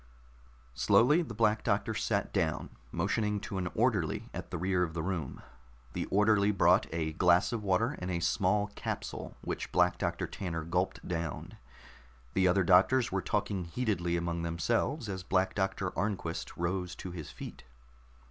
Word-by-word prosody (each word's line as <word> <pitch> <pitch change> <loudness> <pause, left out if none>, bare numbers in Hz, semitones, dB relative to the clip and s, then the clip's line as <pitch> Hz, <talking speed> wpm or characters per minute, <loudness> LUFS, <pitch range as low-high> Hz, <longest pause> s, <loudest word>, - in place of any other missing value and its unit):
Slowly 140 - +4
the 120 -10 -6
Black 110 -1 +2
Doctor - - +1
sat - - -1
down, - - -1 0.2
motioning 105 -2 0
to 95 - -4
an 90 - -1
orderly 110 - 0
at - - -6
the 90 - -3
rear 90 +1 +1
of 85 -2 -1
the 80 - -2
room. 85 -7 -3 0.5
The - - -2
orderly 105 0 +3
brought 100 -3 +4
a 80 -1 -2
glass 90 +6 +4
of 115 - -2
water 110 +8 +1
and 90 - -4
a 85 -2 -1
small 100 +4 +1
capsule - - -5
which - - -4
Black 90 0 +3
Doctor - - -1
Tanner 80 -4 -4
gulped 90 +3 -1
down. 85 -4 -4 0.8
The 95 -1 +3
other 95 +2 +3
doctors 100 +8 +4
were 95 0 0
talking 100 -3 -1
heatedly 90 -3 -1
among 85 0 -2
themselves 115 - 0
as 95 -2 -4
Black 95 +1 +1
Doctor 95 -1 -1
Arnquist 90 -3 -3
rose 90 +1 -2
to 90 - -7
his 80 -4 -7
feet. - - -9
95 Hz, 160 wpm, -31 LUFS, 85-105 Hz, 0.8 s, Slowly